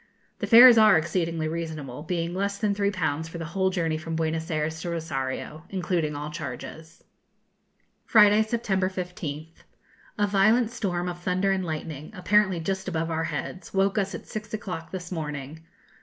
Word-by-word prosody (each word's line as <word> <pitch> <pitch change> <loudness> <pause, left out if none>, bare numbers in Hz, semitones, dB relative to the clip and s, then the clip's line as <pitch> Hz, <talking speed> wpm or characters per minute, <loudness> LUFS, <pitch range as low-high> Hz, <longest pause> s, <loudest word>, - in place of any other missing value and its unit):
The - - -2
fares 240 0 +9
are 215 -5 +7
exceedingly 165 0 -1
reasonable, 155 -5 -5
being 170 +1 -2
less 200 +2 -1
than 205 -1 +1
3_l_. 180 -7 -1
for 170 - -7
the 165 - -5
whole 190 +3 0
journey 165 -4 -1
from 165 +1 -5
Buenos 160 +1 -2
Ayres 160 0 -2
to 175 - -4
Rosario, 155 -1 -4
including 175 -5 -1
all 150 +1 -5
charges. 155 +3 -8 1.0
Friday, 210 -1 +6
September 215 -4 0
15th. 175 -4 -6 0.6
A 205 - +3
violent 215 +4 +3
storm 180 -6 -2
of 175 0 -5
thunder 185 +2 0
and 190 -1 0
lightning, 155 -3 -5
apparently 190 -1 +2
just 190 +3 -3
above 165 -2 -2
our 160 0 -1
heads, 165 +5 -5
woke 195 +1 +2
us 195 -1 -2
at - - -8
six 215 0 -5
o'clock 180 -6 -6
this 180 -1 -7
morning. 150 -2 -5
175 Hz, 160 wpm, -26 LUFS, 160-195 Hz, 1.0 s, fares